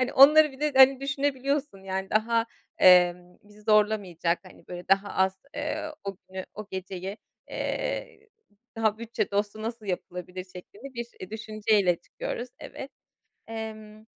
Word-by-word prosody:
hani, 255 - 0
onları 300 +2 +8
bir 265 - -14
de, 300 -1 +1
hani, 265 0 +8
düşünebiliyorsun 275 -2 -1
yani. 190 0 -3
Daha, 230 +1 +2 0.3
emm, 180 -1 +5
bizi 210 +1 -18
zorlamayacak, 205 -6 +2
hani, 185 - -16
böyle 180 0 -8
daha 195 +1 +3
az, 190 0 +1 0.2
eee, 310 0 -3
o 195 -1 -4
günü, 190 0 -6
o 215 -1 -7
geceyi, 190 +1 -5 0.3
eee, - - -3 0.5
"Daha 220 -1 +1
bütçe 230 -1 -2
dostu 205 +2 -1
nasıl 225 -1 -5
yapılabilir?" 180 0 -5
şeklinde 205 +8 -12
bir, 235 0 -4
eee, 185 +2 -8
düşünceyle 215 -4 +1
çıkıyoruz. 245 +8 -6
Evet. 270 - -8 0.6
Emm, 220 -1 -7
215 Hz, 140 wpm, -27 LUFS, 190-255 Hz, 0.6 s, onları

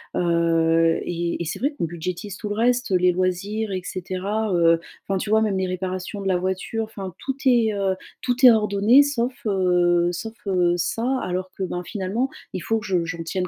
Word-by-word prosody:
heu, 165 -1 +2
et 170 0 -2
et - - -2
c'est 160 - -4
vrai 285 +4 0
qu'on - - 0
budgétise 175 +4 -5
tout 210 - -5
le 205 - -2
reste, 245 +1 +1
heu, - - +4
les 180 0 +4
loisirs 195 +4 -1
et 185 -1 -2
cetera, 190 +4 -3
heu, 165 -1 +4 0.3
enfin 195 - 0
tu 195 - -4
vois 220 +1 +4
même 210 -3 +1
les 190 0 0
réparations 185 +2 -4
de 195 - -3
la 185 -2 +2
voiture, 190 +5 -2
enfin, 195 -4 -7
tout 270 - -3
est, 235 -4 +4
heu, 195 -2 0 0.3
tout 250 +1 +2
est 250 - +11
ordonné 215 +4 +5
sauf, 260 -3 -1
heu 180 -3 +2
sauf, 220 +6 -5
heu, 180 -2 +2
ça, 230 +9 -1
alors 185 +1 -3
que 195 - -2
ben 180 -1 -3
finalement 210 +7 -2 0.2
il - - -2
faut 225 +4 0
que 215 - -10
je 180 -3 0
j'en 165 0 -5
tienne 180 +2 -2
190 Hz, 210 wpm, -23 LUFS, 175-220 Hz, 0.3 s, est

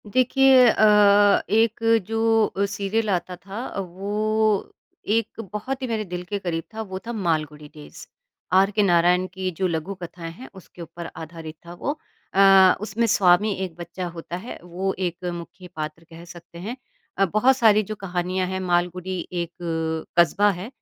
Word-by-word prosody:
देखिए 255 +3 +5
अ, 205 -2 +5
एक 225 +1 +2 0.3
जो 225 -2 +1
सीरियल 205 +2 -2
आता 180 -1 -1
था 200 +7 -7
वो 205 +3 -1 0.3
एक 225 +1 -1
बहुत 260 +6 -4
ही 260 - -2
मेरे 225 -2 -2
दिल 180 -1 -5
के 205 - -1
करीब 165 -3 -3
था, 220 - -5
वो 190 -3 -6
था 235 - -3
मालगुड़ी 155 -7 -2
डेज़ 150 -1 -12 0.5
आर 195 +2 +5
के 210 0 +2
नारायण 180 0 +3
की 190 -1 -3
जो 190 - +1
लघु 170 +3 -3
कथाएँ 170 -1 -7
हैं, 245 +11 -12
उसके 185 -2 -14
ऊपर 170 +1 -8
आधारित 160 0 -8
था 170 - -9
वो। 285 - -4 0.3
अ, 195 -1 +7
उसमें 220 +2 -1
स्वामी 205 0 +4
एक 175 -3 -10
बच्चा 175 +2 -6
होता 170 +1 -6
है, 215 +7 -8
वो 185 +2 -3
एक 180 -1 -3
मुख्य 175 +2 -9
पात्र 155 +1 -6
कह 165 0 -12
सकते 170 -1 -13
हैं 220 +8 -6 0.4
अ, 195 - +4
बहुत 215 +8 +3
सारी 215 -4 +5
जो 215 +2 -6
कहानियाँ 185 -1 -2
हैं 190 +1 -3
मालगुड़ी 180 0 -1
एक 170 -2 -3 0.7
कस्बा 200 +4 +4
है। 185 +2 -6
190 Hz, 165 wpm, -23 LUFS, 175-215 Hz, 0.7 s, अ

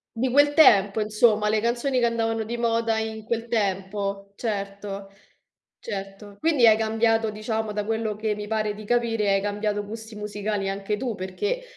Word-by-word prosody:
Di 250 +3 0
quel 290 +2 +5
tempo, 205 -9 +6
insomma, 215 0 +3
le 215 0 +2
canzoni 245 +3 0
che 240 - +3
andavano 225 -1 -1
di 235 +2 -4
moda 230 -1 +1
in 220 0 -4
quel 230 +1 -3
tempo, 200 -2 -2
certo, 200 -2 -4 0.7
certo. 200 -1 -7
Quindi 305 -7 +4
hai 220 -1 +7
cambiato 225 0 +2
diciamo, 220 0 -3
da 210 0 -2
quello 220 -1 -2
che 215 0 -1
mi 210 0 -6
pare 215 -1 -1
di 215 +1 -10
capire, 225 -3 +1
hai 195 - +3
cambiato 205 0 -2
gusti 220 +1 -8
musicali 210 -1 -3
anche 200 +2 -2
tu, 235 +1 -3
perché, 415 - -3
215 Hz, 170 wpm, -25 LUFS, 205-230 Hz, 0.7 s, hai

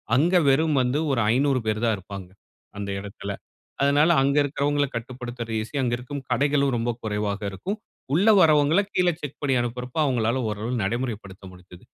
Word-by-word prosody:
அங்க 165 +8 +3
வெறும் 155 +2 +3
வந்து 125 +4 0
ஒரு 130 - +1
500 135 +1 +2
பேரு 110 0 0
தான் 115 -2 +2
இருப்பாங்க. 95 -1 -9 0.5
அந்த 100 -1 -4
இடத்துல. 100 0 -7 0.5
அதனால 145 +3 +4
அங்க 140 +1 +2
இருக்கறவங்கள 145 0 0
கட்டுப்படுத்றது 120 -1 -6
ஈசி, 115 +6 -8
அங்க 120 -2 0
இருக்கும் 130 +3 -6
கடைகளும் 140 +1 +2
ரொம்ப 115 +1 -1
குறைவாக 105 -1 -2
இருக்கும். 190 - -4 0.4
உள்ள 190 +8 +4
வரவங்கள 155 0 +5
கீழே 180 -1 +3
செக் 145 -2 -7
பண்ணி 140 -2 +1
அனுப்புறப்போ 125 +4 -4
அவங்களால 120 -2 +1
ஓரளவு 105 +4 -3
நடைமுறைப்படுத்த 105 -3 -4
முடிஞ்சது. 90 -1 -15
125 Hz, 155 wpm, -24 LUFS, 110-145 Hz, 0.5 s, வரவங்கள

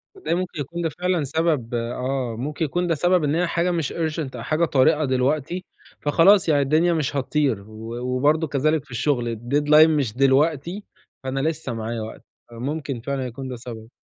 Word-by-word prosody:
تصدقي 375 - -2
ممكن 180 -3 -3
يكون 170 +5 -5
ده 165 - 0
فعلًا 180 -1 -1
سبب 145 -4 0
آه، 125 +1 -2
ممكن 150 +4 -2
يكون 175 +4 -1
ده 165 - +1
سبب 175 +2 +2
إن 145 +1 +1
هي 175 +1 +1
حاجة 170 +2 0
مش 165 -5 -2
urgent 155 -5 -3
أو 115 - -6
حاجة 155 +7 +1
طارقة 150 +1 +3
دلوقتي، 140 +7 0 0.4
فخلاص 170 +6 +5
يعني 145 -2 +4
الدنيا 155 +5 +3
مش 150 -4 -1
هتطير، 140 -5 0
و 110 +2 -8
وبرضه 145 +6 +1
كذلك 150 +1 +1
في - - -19
الشغل، 120 -2 0
الdeadline 145 +7 +4
مش 145 -8 0
دلوقتي، 150 +7 +2 0.4
فأنا 130 +1 -2
لسه 155 -3 -2
معايا 115 0 -4
وقت. 110 +1 -8 0.3
آآ - - -11
ممكن 140 -2 -3
فعلًا 135 +1 -3
يكون 125 +2 -6
ده 130 - -5
سبب. 115 -2 -9
145 Hz, 185 wpm, -23 LUFS, 125-160 Hz, 0.4 s, فخلاص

